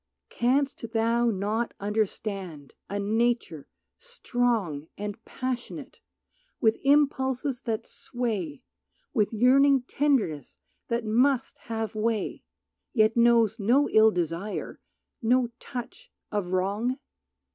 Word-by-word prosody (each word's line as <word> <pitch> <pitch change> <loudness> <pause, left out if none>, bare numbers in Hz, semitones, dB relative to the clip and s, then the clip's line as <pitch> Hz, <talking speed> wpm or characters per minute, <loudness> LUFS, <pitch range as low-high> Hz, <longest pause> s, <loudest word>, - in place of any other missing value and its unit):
Canst 270 +3 +1
thou 230 +1 +2
not 215 +3 -1
understand 195 -7 -3 0.2
a 200 - -2
nature 220 - 0 0.3
strong 240 - -1
And 210 +2 -6
passionate, 255 -2 -5 0.6
with 220 -1 +2
impulses 270 -2 +2
that 225 -3 -2
sway, 205 - -4 0.5
With 215 -6 +2
yearning 265 +4 +4
tenderness 250 - 0 0.3
that 235 -1 -1
must 245 +4 +2
have 225 -2 -2
way, 215 -1 -1 0.5
Yet 220 -2 +3
knows 235 -2 +4
no 250 +8 +3
ill 220 0 +7
desire, 175 +2 -3 0.4
no 245 +1 +2
touch 480 - -8 0.2
of 205 -4 -1
wrong? 200 +8 0
230 Hz, 100 wpm, -27 LUFS, 205-250 Hz, 0.6 s, ill